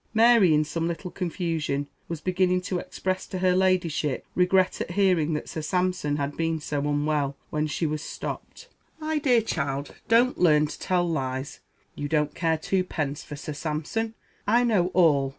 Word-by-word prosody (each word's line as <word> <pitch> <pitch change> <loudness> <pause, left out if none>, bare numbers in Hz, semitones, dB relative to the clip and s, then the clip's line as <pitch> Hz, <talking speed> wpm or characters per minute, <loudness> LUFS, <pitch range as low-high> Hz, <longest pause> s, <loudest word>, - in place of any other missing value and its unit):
Mary, 225 -5 +6
in 155 0 +4
some 165 +2 -2
little 170 +2 -4
confusion, 165 -6 -2 0.2
was 165 -2 -5
beginning 180 +1 +2
to 180 0 -2
express 185 +1 -3
to 190 - -5
her 180 0 +3
Ladyship 175 -6 +1
regret 185 +1 +2
at - - -3
hearing 180 -5 +2
that 150 - -3
Sir 160 - -5
Sampson 180 -2 0
had 145 0 -2
been 165 -1 0
so 150 -1 -3
unwell, 145 -1 0
when 150 0 0
she 160 +2 -2
was 150 -1 -2
stopped. 475 - -7 0.3
"My 310 0 -1
dear 250 -6 +3
child, 140 -7 -2
don't 240 +3 +4
learn 150 -4 +5
to 150 - -7
tell 180 -1 +1
lies. 135 -4 -3 0.3
You 145 - -4
don't 150 0 +1
care 165 -2 +1
two 185 +4 0
pence 145 -5 -3
for 150 - -8
Sir 150 +1 -6
Sampson. 160 +10 -3 0.3
I 235 +4 +4
know 210 -7 +3
all. 145 -7 +4
165 Hz, 175 wpm, -26 LUFS, 150-185 Hz, 0.3 s, Mary